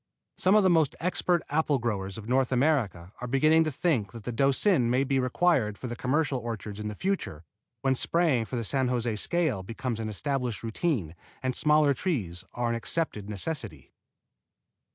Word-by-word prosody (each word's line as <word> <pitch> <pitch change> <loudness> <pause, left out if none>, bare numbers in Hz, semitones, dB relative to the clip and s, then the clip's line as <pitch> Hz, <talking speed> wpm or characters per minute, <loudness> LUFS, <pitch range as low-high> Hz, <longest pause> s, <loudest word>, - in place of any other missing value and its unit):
Some 185 +3 +4
of 210 - +5
the 185 - +4
most 160 -4 +3
expert 180 0 +1
apple 150 -1 +2
growers 100 -6 -3
of 110 -1 -9
North 130 +2 +2
America 120 - +1
are 125 - -4
beginning 155 +5 +4
to 155 - -1
think 125 - 0
that 115 -2 -9
the 125 - -4
Doucin 135 - +3
may 130 +3 +2
be 135 -1 +1
required 125 -5 +1
for - - -8
the 120 -1 -4
commercial 135 +1 0
orchards 110 -3 -6
in 105 - -4
the 105 - -5
future, 180 - -2 0.4
when 135 -1 +2
spraying 140 -3 +2
for 125 - -6
the 120 - -2
San 130 +3 +1
José 120 -3 -1
scale 160 - 0
becomes 115 +4 -4
an 110 -1 -3
established 125 +1 -2
routine 115 - -1 0.3
and 130 -1 -1
smaller 150 -1 +4
trees 110 - -3
are 120 -1 -1
an - - 0
accepted 115 -4 -2
necessity. 100 - -5
125 Hz, 180 wpm, -28 LUFS, 110-155 Hz, 0.4 s, of